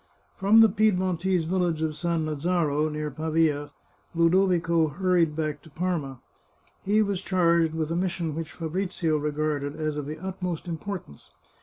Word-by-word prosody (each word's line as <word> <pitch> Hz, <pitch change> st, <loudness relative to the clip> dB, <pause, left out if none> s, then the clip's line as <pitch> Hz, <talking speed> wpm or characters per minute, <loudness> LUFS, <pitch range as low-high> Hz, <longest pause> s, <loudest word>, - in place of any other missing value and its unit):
From 210 Hz, +4 st, +5 dB
the 225 Hz, -, +8 dB
Piedmontese 185 Hz, -3 st, +1 dB
village 170 Hz, -2 st, 0 dB
of 160 Hz, -, 0 dB
Sannazaro, 155 Hz, -1 st, 0 dB
near 150 Hz, 0 st, -3 dB
Pavia, 155 Hz, -1 st, 0 dB, 0.5 s
Ludovico 170 Hz, -1 st, +3 dB
hurried 170 Hz, 0 st, +1 dB
back 155 Hz, -2 st, -2 dB
to 160 Hz, -, -16 dB
Parma. 155 Hz, -5 st, -3 dB, 0.6 s
He 210 Hz, +2 st, +3 dB
was 200 Hz, -3 st, -2 dB
charged 170 Hz, -4 st, +2 dB
with 160 Hz, 0 st, -2 dB
a -, -, 0 dB
mission 175 Hz, -3 st, -1 dB
which 160 Hz, 0 st, -5 dB
Fabrizio 165 Hz, -1 st, -1 dB
regarded 150 Hz, -1 st, -2 dB
as 155 Hz, -1 st, -2 dB
of 145 Hz, -1 st, -4 dB
the 155 Hz, -, -5 dB
utmost 180 Hz, -2 st, -4 dB
impor 180 Hz, +3 st, -5 dB
tance. 70 Hz, -, -17 dB
165 Hz, 145 wpm, -26 LUFS, 155-180 Hz, 0.6 s, the